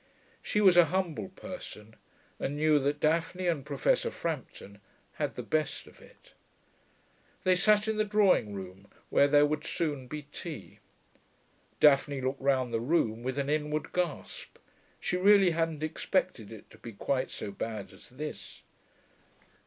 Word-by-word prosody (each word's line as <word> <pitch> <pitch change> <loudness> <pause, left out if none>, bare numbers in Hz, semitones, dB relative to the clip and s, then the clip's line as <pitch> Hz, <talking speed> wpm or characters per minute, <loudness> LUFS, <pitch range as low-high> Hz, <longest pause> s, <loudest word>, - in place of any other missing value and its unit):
She 210 - 0
was 185 -4 +6
a 175 - +8
humble 185 +1 -2
person, 180 - -10 0.4
and 140 - -2
knew 150 0 +3
that 145 +2 -1
Daphne 165 +4 0
and 165 -6 0
Professor 140 -1 +1
Frampton 100 0 -6 0.4
had - - -1
the - - -5
best 155 -1 -1
of - - -18
it. - - -19 1.1
They 185 0 +4
sat 210 +3 +3
in 220 -1 0
the 215 - +3
drawing 200 - +2
room, 95 +1 -9 0.2
where 140 - +5
there 145 0 +5
would 150 0 -2
soon 145 -7 -2
be 150 +3 -6
tea. - - -8 1.0
Daphne 140 -1 +4
looked 130 +1 -3
round 130 -3 +1
the 115 - +1
room 115 -4 +1
with 130 +2 -3
an 140 -1 -1
inward 150 +1 -1
gasp: 180 -4 -4 0.4
she 180 - -1
really 195 -1 +6
hadn't 165 -2 -1
expected 155 - -1
it 110 -2 -12
to - - -16
be 115 - -9
quite 130 +5 -1
so 100 - -6
bad 105 -1 -5
as 95 - -16
this. 150 +4 -8
150 Hz, 155 wpm, -30 LUFS, 130-175 Hz, 1.1 s, a